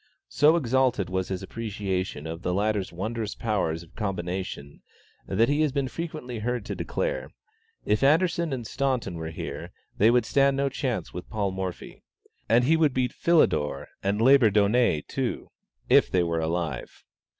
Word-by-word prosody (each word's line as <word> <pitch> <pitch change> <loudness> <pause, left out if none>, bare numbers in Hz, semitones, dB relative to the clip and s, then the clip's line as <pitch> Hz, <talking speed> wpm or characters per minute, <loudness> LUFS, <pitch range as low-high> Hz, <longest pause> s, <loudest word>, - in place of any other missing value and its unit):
So 150 +3 +4
exalted 130 - +1
was 95 0 -1
his 95 0 -4
appreciation 95 -6 -3
of 80 +1 -6
the 90 0 -1
latter's 105 -1 0
wondrous 110 +4 -4
powers 85 -7 -1
of 80 - -19
combination, 90 -6 -4 0.5
that 110 +5 +2
he 145 +2 +1
has 155 -2 +2
been 140 -1 -1
frequently 150 -6 -5
heard 120 0 -2
to - - -4
declare - - -2 0.6
"If 105 - +1
Anderssen 165 +3 +3
and 125 -3 -3
Staunton 130 -5 -1
were 80 -1 -5
here, 80 - -6 0.3
they 110 - +6
would 120 -1 +3
stand 140 +3 +3
no 140 0 +1
chance 130 -3 -3
with 90 - -7
Paul 105 -3 -1
Morphy; 95 -2 -6 0.5
and 120 +2 +5
he 155 +6 +4
would 155 -5 +2
beat 125 -1 0
Philidor 115 - +2
and 100 +2 0
Labourdonnais 115 - +4
too, - - -3 0.4
if - - +5
they 90 -1 +2
were 85 -1 -1
alive." 80 0 -3
110 Hz, 160 wpm, -26 LUFS, 95-135 Hz, 0.6 s, they